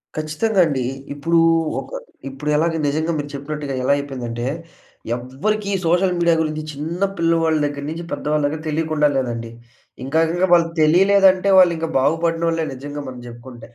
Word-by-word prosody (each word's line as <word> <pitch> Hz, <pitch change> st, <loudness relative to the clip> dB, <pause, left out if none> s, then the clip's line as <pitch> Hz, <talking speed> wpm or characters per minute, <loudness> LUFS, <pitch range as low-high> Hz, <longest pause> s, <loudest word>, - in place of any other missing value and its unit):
ఖచ్చితంగా 155 Hz, +8 st, -1 dB
అండి. 140 Hz, -5 st, -1 dB, 0.3 s
ఇప్పుడూ 165 Hz, +4 st, +1 dB, 0.4 s
ఒక -, -, -9 dB, 0.4 s
ఇప్పుడు 140 Hz, +3 st, -5 dB
ఎలాగా 165 Hz, +1 st, +1 dB
నిజంగా 155 Hz, +3 st, 0 dB
మీరు 145 Hz, -1 st, -4 dB
చెప్పినట్టుగా 145 Hz, 0 st, -5 dB
ఎలా 140 Hz, -, +3 dB
అయిపోయిందంటే 125 Hz, -4 st, -5 dB, 0.7 s
ఎవ్వరికి 200 Hz, -, -3 dB
సోషల్ 180 Hz, +2 st, +2 dB
మీడియా 170 Hz, -1 st, +3 dB
గురించి 155 Hz, -1 st, -2 dB
చిన్న 160 Hz, +6 st, -5 dB, 0.2 s
పిల్లవాళ్ళ 165 Hz, -1 st, +2 dB
దగ్గర 145 Hz, -1 st, -4 dB
నుంచి 165 Hz, +2 st, -5 dB
పెద్దవాళ్ళ 150 Hz, 0 st, -1 dB
దగ్గర 155 Hz, +2 st, -4 dB
తెలియకుండా 155 Hz, -1 st, +1 dB
లేదండి. 115 Hz, -3 st, -3 dB, 0.5 s
ఇంకా 155 Hz, +4 st, +1 dB
ఇంకా 180 Hz, +2 st, +1 dB
వాళ్ళకి 165 Hz, -1 st, +3 dB
తెలియలేదంటే 190 Hz, +4 st, +4 dB
వాళ్ళు 180 Hz, -2 st, +6 dB
ఇంకా 165 Hz, 0 st, -3 dB
బాగుపడినోళ్ళే 165 Hz, +3 st, 0 dB
నిజంగా 145 Hz, +2 st, -7 dB
మనం 125 Hz, -1 st, -8 dB
జెప్పుకుంటే. 120 Hz, 0 st, -11 dB
155 Hz, 145 wpm, -20 LUFS, 140-170 Hz, 0.7 s, వాళ్ళు